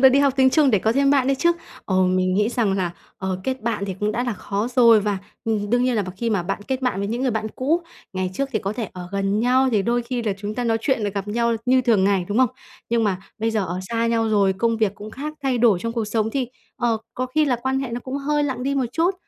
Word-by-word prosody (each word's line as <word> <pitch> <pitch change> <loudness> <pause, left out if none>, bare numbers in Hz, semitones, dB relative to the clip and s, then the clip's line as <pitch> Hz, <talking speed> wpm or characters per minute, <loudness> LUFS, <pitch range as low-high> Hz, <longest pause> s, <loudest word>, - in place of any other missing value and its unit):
là 265 - +9
đi 265 +2 +3
học 280 -1 +4
tiếng 260 -1 +5
Trung 295 -1 +4
để 210 - +4
có 220 +4 +1
thêm 275 +2 +3
bạn 275 -3 +3
đấy 275 0 +2
chứ. 340 +4 +4 0.3
Ờm, 185 -1 +2
mình 185 0 +1
nghĩ 210 +2 +2
rằng 230 -4 +1
là, 185 -3 0 0.3
ờ, 190 -1 -3
kết 260 0 -2
bạn 220 -3 -1
thì 190 - -3
cũng 210 +1 0
đã 245 +3 -1
là 245 - -1
khó 205 +3 -3
rồi 230 -3 +7
và, 205 -1 -1 0.3
ừm, 210 -3 -1
đương 245 +1 +3
nhiên 255 -1 +1
là 210 - +2
b 185 - -7
khi 230 +3 -1
mà 200 -5 +1
bạn 195 +3 -3
kết 265 0 -1
bạn 250 -7 0
với 200 0 -2
những 235 +4 -2
người 260 - +2
bạn 220 -1 -2
cũ, 315 +7 +1 0.3
ngày 185 -1 -2
trước 275 +7 -1
thì 215 - +1
có 195 0 -3
thể 220 -3 -4
ở 180 -1 -8
gần 200 +1 0
nhau 255 +2 +3
thì 210 -3 +3
đôi 240 +3 +1
khi 240 0 -3
là 215 -3 0
chúng 205 +1 -4
ta 245 - -2
nói 225 -1 +1
chuyện 250 -1 0
rồi 205 - 0
gặp 200 0 -4
nhau 235 +1 +1
như 255 +1 +5
thường 225 -6 +3
ngày, 195 -2 +2
đúng 205 +3 0
không? 255 -3 +4 0.4
Nhưng 230 -1 +2
mà 190 -3 0 0.2
bây 225 +1 0
giờ 215 -3 0
ở 175 +1 -3
xa 230 0 +1
nhau 230 -1 +1
rồi, 200 -3 +3
công 230 +4 0
việc 215 -3 +1
cũng 210 +1 -9
khác, 300 +6 -6
thay 265 -3 +1
đổi 225 -5 +4
trong 230 - -2
cuộc 230 -2 -1
sống 220 +1 -1
thì, 255 0 -1 0.3
ờ, 235 -2 +1 0.2
có 255 - -2
khi 305 +5 +2
là 255 -4 +1
quan 265 0 0
hệ 270 - -3
nó 240 +1 -3
cũng 260 +2 -5
hơi 295 +1 0
lặng 260 -3 -3
đi 275 +1 0
một 265 -3 +1
chút. 340 +5 +2
230 Hz, 300 wpm, -22 LUFS, 205-255 Hz, 0.4 s, là